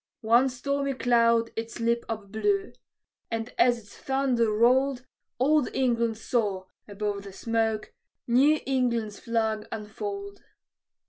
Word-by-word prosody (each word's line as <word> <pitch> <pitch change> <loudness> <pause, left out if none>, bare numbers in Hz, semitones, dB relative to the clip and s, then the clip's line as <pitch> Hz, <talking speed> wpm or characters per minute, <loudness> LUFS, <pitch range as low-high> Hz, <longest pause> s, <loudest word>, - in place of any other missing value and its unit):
One 235 +4 +4
stormy 275 +2 -2
cloud 230 -2 +3
its 230 +1 -5
lip 235 0 0
upblew; 225 - -1 0.6
and 225 +1 -4
as 245 -1 +5
its 210 -3 -15
thunder 260 -4 +1
rolled, 255 +4 +3 0.3
Old 290 +2 +3
England 235 -3 +1
saw, 210 -5 -1 0.2
above 205 0 -3
the 200 0 -10
smoke, 225 0 -1 0.3
New 275 +6 +4
England's 235 -5 0
flag 220 -2 -1
unfold. 400 - -6
235 Hz, 115 wpm, -27 LUFS, 220-265 Hz, 0.6 s, as